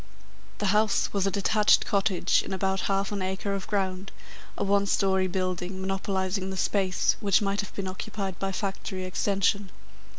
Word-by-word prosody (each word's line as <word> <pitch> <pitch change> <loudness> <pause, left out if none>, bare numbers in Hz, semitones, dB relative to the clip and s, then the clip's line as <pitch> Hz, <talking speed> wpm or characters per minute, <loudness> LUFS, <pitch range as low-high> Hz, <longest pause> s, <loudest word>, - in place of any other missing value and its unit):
The 210 - -2
"house" 210 -1 +2
was 200 -1 +1
a - - +3
detached 205 +2 +3
cottage 195 -3 +2
in - - -5
about 190 0 0
half 195 +1 0
an 205 -2 -2
acre 190 +2 -2
of 195 -1 -4
ground, 190 -2 -2 0.5
a - - -1
one 200 0 +2
storey 190 -1 +2
building, 185 0 -2
monopolising 190 0 -1
the 190 - -5
space 190 -1 +1
which 200 -3 +3
might 200 +1 0
have 205 - -10
been 195 -1 -3
occupied 190 0 -5
by 195 0 -1
factory 190 -1 -4
extension. 200 +1 0
195 Hz, 165 wpm, -27 LUFS, 190-200 Hz, 0.5 s, a